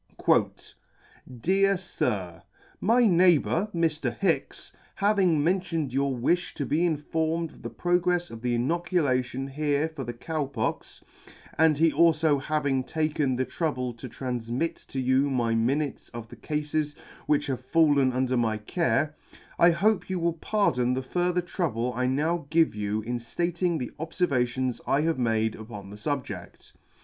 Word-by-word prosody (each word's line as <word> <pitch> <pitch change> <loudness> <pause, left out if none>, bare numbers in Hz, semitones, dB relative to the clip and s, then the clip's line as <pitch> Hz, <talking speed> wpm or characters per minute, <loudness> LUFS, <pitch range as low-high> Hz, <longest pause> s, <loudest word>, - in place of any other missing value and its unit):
" 120 -3 -3
Dear 195 +2 +3
Sir, 100 - -3 0.2
" - - -30
My 245 +1 +5
neighbour, 180 0 +3
Mr. 165 -3 -1
Hicks, 185 -4 -1 0.2
having 195 -7 +2
mentioned 165 -5 0
your 135 -1 0
wifh 175 +9 0
to 140 - -2
be 155 +5 +1
informed 160 +1 -1
of - - -17
the - - -5
progrefs 175 0 0
of 115 -1 -9
the 120 0 0
inoculation 135 -3 0
here 145 +2 0
for 155 -4 -7
the 120 -1 -5
Cow 155 +5 -3
Pox, 130 -5 -4 0.5
and 160 -2 +4
he 165 +1 +4
alfo 155 -2 +3
having 140 -3 0
taken 150 -2 0
the 130 +1 0
trouble 125 -3 -2
to 120 +2 -9
tranfmit 125 +4 -3
to 135 - -4
you 130 +2 +2
my 120 -4 0
minutes 135 +5 -1
of 115 -1 -7
the - - -10
Cafes 150 -1 -2 0.3
which 150 - +2
have 130 -2 -3
fallen 145 -3 +3
under 130 0 0
my 115 -3 +1
care, 155 +5 0 0.4
I 170 - +7
hope 195 +5 +1
you 185 - -1
will 170 -1 0
pardon 130 - +1
the 130 - -2
further 180 +5 0
trouble 135 - -2
I 125 +1 0
now 150 +4 0
give 165 -3 +3
you 105 +1 -2
in 120 +1 -3 0.2
Rating 175 0 0
the 125 -5 -4
obfervations 130 -7 -1
I 140 - +3
have 160 -3 0
made 110 -2 +1
upon 105 -3 -9
the - - -8
fubjedt. 110 - -5
145 Hz, 155 wpm, -27 LUFS, 125-170 Hz, 0.5 s, I